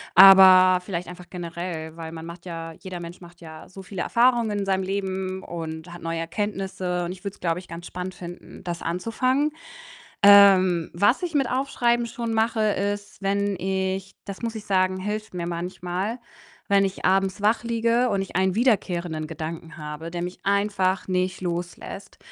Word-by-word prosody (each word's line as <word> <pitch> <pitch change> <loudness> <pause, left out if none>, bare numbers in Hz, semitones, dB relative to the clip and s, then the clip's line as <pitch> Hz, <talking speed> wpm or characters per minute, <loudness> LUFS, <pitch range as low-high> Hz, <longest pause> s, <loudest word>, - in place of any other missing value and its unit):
Aber 185 -1 +9
vielleicht 180 -2 -4
einfach 180 0 -10
generell, 170 -2 -6
weil 165 -1 -7
man 160 0 -8
macht 170 +1 -10
ja 165 -1 -6
jeder 185 -2 -6
Mensch 170 +1 -9
macht 175 0 -14
ja 160 -2 -11
so 190 +1 -11
viele 190 -1 -5
Erfahrungen 235 -4 +2
in 200 - -2
seinem 190 -1 +1
Leben 190 -1 -3
und 165 0 -6
hat 175 - -10
neue 165 0 -3
Erkenntnisse 185 0 -3
und 175 - -4
ich 185 - -15
würde 200 0 -5
es, - - -26
glaube 170 0 -1
ich, 185 - -13
ganz 170 +1 -8
spannend 180 0 -6
finden, 175 0 -10
das 170 -1 -4
anzufangen. 255 - 0 0.7
Ähm, 190 -4 +7
was 205 - +3
ich 345 -3 -3
mit 275 -4 +2
Aufschreiben 240 -2 +1
schon 230 0 -4
mache, 220 0 +1
ist, 205 -1 -2
wenn 200 +1 0
ich 190 +1 -2
das 200 +3 -8
muss 230 -1 -3
ich 220 -2 -7
sagen, 185 -2 +2
hilft 210 +1 -4
mir 170 -1 -3
manchmal, 180 +5 -3 0.5
wenn 200 0 +5
ich 195 0 -2
abends 190 0 +2
wach 215 +3 +2
liege 235 +1 +1
und 200 -1 0
ich 195 - -5
einen 190 0 +2
wiederkehrenden 180 -9 0
Gedanken 165 +1 -7
habe, 150 +2 -6
der 175 0 -4
mich 180 +1 -5
einfach 200 -2 +1
nicht 185 0 -1
loslässt 175 +2 -5
185 Hz, 175 wpm, -24 LUFS, 175-205 Hz, 0.7 s, Aber